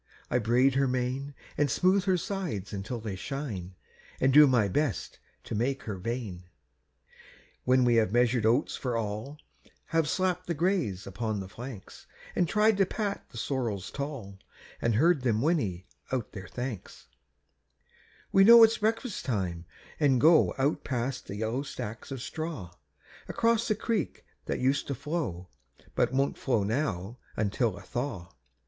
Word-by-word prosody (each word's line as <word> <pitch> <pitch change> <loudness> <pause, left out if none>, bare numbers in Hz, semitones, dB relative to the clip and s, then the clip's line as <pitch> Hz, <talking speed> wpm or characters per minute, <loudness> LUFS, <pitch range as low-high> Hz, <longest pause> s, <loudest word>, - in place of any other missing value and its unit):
I 125 - +3
braid 125 +4 +3
her 135 +1 +2
mane, 130 +3 -2 0.2
An' 145 - +4
smooth 185 +8 +2
her 190 -2 +3
sides 170 - -4
until 105 +5 -4
they 105 -3 -5
shine, 95 -5 -5 0.4
An' 130 - +3
do 150 +2 +9
my 120 -6 +3
best 115 - -1 0.2
to - - -6
make 130 +5 -1
her 105 - -4
vain. 105 -4 -4 1.2
When 130 0 +4
we 120 -1 +4
have 110 -4 +3
measured 120 0 +3
oats 120 +7 +2
for 125 -3 -2
all, 110 +6 -4 0.5
Have 165 -2 +1
slapped 180 0 0
the 170 - -1
grays 155 - 0
upon 105 +2 -3
the 95 - -6
flanks, 120 0 -10 0.3
An' 175 - +2
tried 210 +2 +3
to 195 - +4
pat 205 -1 -3
the 120 - -11
sorrels 115 -7 -2
tall, 135 -9 -6 0.4
An' 115 - +2
heard 155 +6 +4
them 115 -4 +1
whinny 110 - 0 0.3
out 125 -5 -2
their 95 -3 -8
thanks, 125 -3 -6 1.3
We 195 - +6
know 230 +2 +10
it's 225 0 +5
breakfast 225 +1 -1
time, 90 -9 -2 0.3
and 140 -5 +4
go 160 +4 +5
Out 140 +3 +1
past 130 0 -3
the 100 - -5
yellow 110 +5 -1
stacks 115 -5 -7
of 135 -3 -5
straw, 155 - -5 0.6
Across 230 0 +1
the 215 - +2
creek 215 -4 -2 0.2
that - - -2
used 135 +2 +1
to 140 - -2
flow, 115 - -4 0.4
But - - +2
won't 135 +1 0
flow 120 -6 +1
now 110 -2 -2 0.2
until 105 0 0
a - - -10
thaw. 120 -9 -4
125 Hz, 155 wpm, -29 LUFS, 105-155 Hz, 1.3 s, know